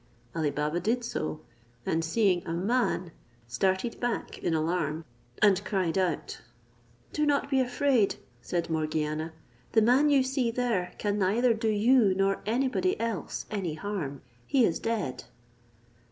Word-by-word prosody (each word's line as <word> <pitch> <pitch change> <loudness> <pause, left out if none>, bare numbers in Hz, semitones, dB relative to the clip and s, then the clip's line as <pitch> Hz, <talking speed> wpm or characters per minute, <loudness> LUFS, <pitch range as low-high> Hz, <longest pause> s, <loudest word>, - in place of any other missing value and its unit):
Ali 160 -3 +1
Baba 150 +3 -1
did 230 +7 0
so, 155 -9 -3 0.4
and 165 0 0
seeing 180 0 +2
a 165 - -2
man, 185 -2 0 0.4
started 190 - 0
back 240 -1 -3
in 165 - 0
alarm, 160 -1 -1 0.4
and 200 -2 +5
cried 185 -6 0
out. 185 -4 -1 0.7
"Do 300 - 0
not 290 -1 +1
be 270 - +3
afraid," 250 -3 +2 0.3
said 170 +4 -2
Morgiana, 155 0 -1 0.4
"the 220 - +5
man 260 +6 +5
you 275 -2 +5
see 260 -2 0
there 230 -7 -1
can 205 0 -1
neither 225 +6 +3
do 220 0 -1
you 215 -1 +4
nor 195 0 +1
any 250 +5 +2
body 370 +9 0
else 230 -5 -3
any 185 -7 -2
harm. 155 -7 -4 0.2
He 260 -4 +4
is 165 - 0
dead." 215 - -2
200 Hz, 145 wpm, -28 LUFS, 165-240 Hz, 0.7 s, and